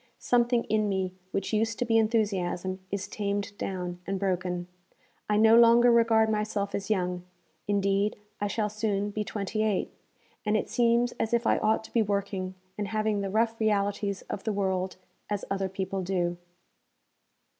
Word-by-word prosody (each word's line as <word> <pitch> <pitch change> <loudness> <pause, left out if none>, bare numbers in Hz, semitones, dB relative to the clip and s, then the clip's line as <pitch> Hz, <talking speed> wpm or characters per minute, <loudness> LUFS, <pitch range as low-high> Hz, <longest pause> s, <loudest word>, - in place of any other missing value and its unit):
Something 240 -1 +2
in 215 -1 +1
me 190 -2 -1 0.2
which 195 +2 -3
used 225 +1 +1
to 245 - 0
be 225 -1 +4
enthusiasm 195 -4 0
is 200 0 -3
tamed 200 -1 -3
down 180 -2 -4
and 195 0 -1
broken. 180 -2 -1 0.6
I 210 - +3
no 220 +1 +6
longer 235 +1 +7
regard 230 -1 +4
myself 210 -2 -1
as 200 +1 -3
young 180 -3 0 0.4
indeed 200 0 +1 0.2
I 205 - 0
shall 210 +1 0
soon 205 -1 -1
be 210 +1 -2
twenty 210 +1 -3
eight 215 -3 0 0.5
and 215 0 +2
it - - -3
seems 240 0 +3
as 225 +2 +1
if 235 0 0
I - - +3
ought 220 +1 +2
to - - -13
be 235 - +4
working 200 -2 -2 0.2
and 205 - -1
having 215 -1 0
the 195 - -2
rough 225 +2 +1
realities 205 -2 0
of 200 - -6
the 220 - -1
world 190 -2 -1 0.3
as 205 -1 -2
other 195 -1 0
people 190 0 -3
do.' 175 -2 -1
205 Hz, 165 wpm, -28 LUFS, 195-220 Hz, 0.6 s, longer